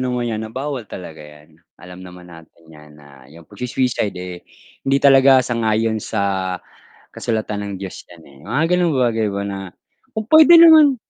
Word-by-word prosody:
naman 125 -2 -2
'yan 110 - -4
na - - -15
bawal 135 +1 -5
talaga 80 -4 -10
'yan. 75 +1 -17 0.2
Alam 90 +1 -13
naman 90 -1 -13
natin 80 0 -17
'yan 75 -1 -17
na 70 -3 -18
yung 85 +2 -16
pagsu-suicide, 120 -1 -3
eh, 90 -1 -8 0.4
hindi 135 0 0
talaga 135 -1 +5
sang-ayon 110 -2 -1
sa 95 -4 -2 0.6
kasulatan 110 -2 -4
ng - - -6
Diyos 95 -1 -8
'yan, 85 -2 -16
eh, 70 -1 -19
mga 130 +7 0
gano'ng 175 -2 +1
bagay 115 -4 0
ba, 100 0 -4
na 100 -1 -5 0.6
kung 220 - -2
puwede 315 +7 +7
naman 315 -4 +7
110 Hz, 170 wpm, -19 LUFS, 90-130 Hz, 0.6 s, puwede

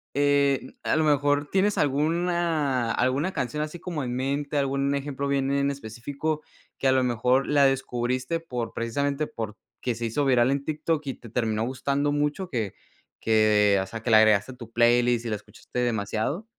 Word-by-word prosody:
eh, 140 -1 +2
a - - 0
lo 160 - +2
mejor, 145 -1 +2
¿tienes 195 +2 +2
alguna 155 -3 +1
alguna 135 +11 0
canción 150 +4 -2
así 155 +3 -5
como 165 -4 -4
en 125 -1 -3
mente, 140 +3 -2
algún 140 0 +1
ejemplo 140 0 -3
bien 140 -1 0
en 140 0 +1
específico 140 +4 -4 0.4
que 135 - +1
a - - +5
lo 130 0 +3
mejor 125 +2 +2
la 145 -1 +4
descubriste 130 +2 -1
por 125 -8 -5
precisamente 140 +5 -1
porque 110 +2 -6
se 115 +1 -4
hizo 130 +6 0
viral 125 -2 +4
en 140 0 -1
TikTok 155 0 -1
y 135 - -2
te 115 - -13
terminó 110 -1 -1
gustando 140 +3 -1
mucho 150 +5 -1
que 110 -7 -2 0.5
que, 105 -2 +4
o - - -3
sea, 115 - -7
que 125 - -2
le 110 - +8
agregaste 110 +1 +4
a - - -15
tu 115 -2 -11
playlist 120 0 +3
y - - -2
la 110 - 0
escuchaste 105 +3 -8
demasiado? 115 - -1
135 Hz, 180 wpm, -26 LUFS, 120-145 Hz, 0.5 s, le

